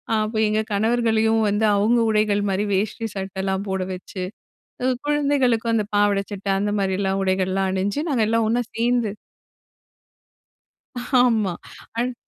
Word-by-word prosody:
அப்போ 215 +1 -1
எங்க 215 +1 +1
கணவர்களையும் 225 +1 +2
வந்து 210 +2 +1
அவங்க 220 +4 +3
உடைகள் 210 -1 +2
மாதிரி 195 +2 0
வேஷ்டி 220 +4 -1
சட்டைலாம் 190 0 -3
போட 190 -1 -1
வச்சு, 185 +1 -7 0.8
குழந்தைகளுக்கும் 275 -6 +1
அந்த 215 -2 +1
பாவாடை 205 -1 +3
சட்டை 200 0 -3
அந்த 205 +1 0
மாதிரியெல்லாம் 195 0 0
உடைகள்லாம் 190 0 0
அணிஞ்சு, 200 +8 -1
நாங்க 245 -6 +2
எல்லாம் 225 -1 +2
ஒண்ணா 240 +2 +2
சேர்ந்து. 235 -2 +1 2.1
ஆமா, 220 -7 +2 0.4
அந். 245 0 -1
210 Hz, 120 wpm, -22 LUFS, 195-230 Hz, 2.1 s, அவங்க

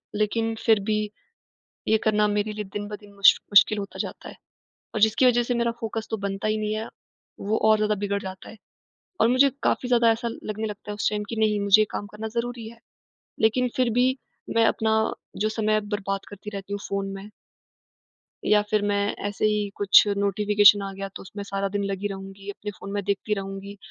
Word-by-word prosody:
लेकिन 225 +2 0
फिर 220 -2 +5
भी 215 0 +2 0.9
ये 220 - +4
करना 210 -1 +3
मेरे 210 +1 -1
लिए 210 0 -4
दिन-ब-दिन 205 +1 -7
मुश 200 0 +7 0.2
मुश्किल 205 +2 +6
होता 200 -1 -6
जाता - - -5
है, - - -11 0.6
और 215 - -1
जिसकी 220 +4 +4
वजह 240 -1 +4
से 245 - -1
मेरा 235 -1 +1
फ़ोकस 225 -1 -4
तो 220 - 0
बनता 195 +1 -2
ही 215 0 +1
नहीं 215 0 -2
है, 220 +1 -3 0.5
वो 210 +2 0
और 215 - +6
ज़्यादा 215 0 +1
बिगड़ 200 0 -1
जाता 190 -1 -8
है। 220 - -12 0.6
और 225 - +5
मुझे 260 +3 +5
काफ़ी 250 - 0
ज़्यादा 235 -2 +4
ऐसा 235 +1 -3 0.2
लगने 215 +1 -3
लगता 210 0 -7
है - - -3
उस 205 - 0
टाइम 210 -1 -2
कि 230 - -5
नहीं, 215 -1 +2
मुझे 200 +1 +5
ये - - 0
काम 205 - -4
करना 210 +2 -7
ज़रूरी 235 0 -4
है, 230 +1 -14 0.6
लेकिन 245 +3 +3
फिर 255 -2 +2
भी 260 +1 +3 0.4
मैं 230 0 +5
अपना 220 0 +1 0.5
जो 215 - +2
समय 215 -1 +1 0.2
बर्बाद 195 -1 -4
करती 205 +1 -9
रहती 200 0 -6
हूँ 205 - -3
फ़ोन 200 0 -2
में। 195 +2 -9 1.2
या 210 0 +5
फिर 215 -1 +2
मैं 200 0 0
ऐसे 205 +1 -1
ही, 210 -1 0
कुछ 205 -1 +7
नोटिफ़िकेशन 205 +1 +4
आ 195 0 -5
गया, 195 0 -6
तो 195 - -10
उसमें 205 +2 -8
सारा 195 0 -2
दिन 200 - -1
लगी 195 +1 -2
रहूँगी। 195 0 -8
अपने 210 +1 -6
फ़ोन 200 - -8
में 205 0 -1
देखती 200 +2 -1
रहूँगी 195 0 -7
210 Hz, 205 wpm, -25 LUFS, 200-220 Hz, 1.2 s, मुश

